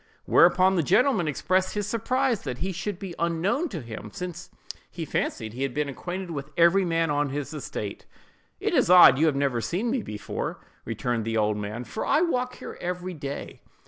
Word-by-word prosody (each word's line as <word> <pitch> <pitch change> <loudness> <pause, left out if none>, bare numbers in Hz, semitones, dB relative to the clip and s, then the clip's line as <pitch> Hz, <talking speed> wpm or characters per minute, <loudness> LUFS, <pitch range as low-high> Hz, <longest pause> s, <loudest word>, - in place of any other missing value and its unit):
Whereupon 190 +1 +5
the - - +4
gentleman 205 - +3
expressed 185 +7 0
his 205 -1 -1
surprise 240 +2 0
that 125 -3 -5
he 190 +6 -2
should 185 +2 -4
be 190 -2 -7
unknown 170 - 0
to 170 -7 -5
him, 110 -2 -8
since 180 - -6 0.4
he 165 - -6
fancied 110 -6 -2
he 125 - -7
had 135 -3 -2
been 150 -1 0
acquainted 175 +6 -5
with 140 -2 -5
every 170 +3 +5
man 165 -3 +1
on 145 0 +1
his 145 +1 -4
estate. 105 -8 -6 0.5
"It - - -1
is - - +3
odd 175 -7 +9
you 160 - +4
have 150 - +2
never 135 -4 0
seen 185 - -1
me 260 -2 0
before," 105 - -5 0.3
returned 115 0 -2
the 115 +1 -1
old 105 -1 +1
man, 105 +3 -4
"for 110 - -5
I 310 - +3
walk 250 -7 0
here - - -9
every 180 +1 -3
day." 140 -3 -6
165 Hz, 195 wpm, -26 LUFS, 135-190 Hz, 0.5 s, odd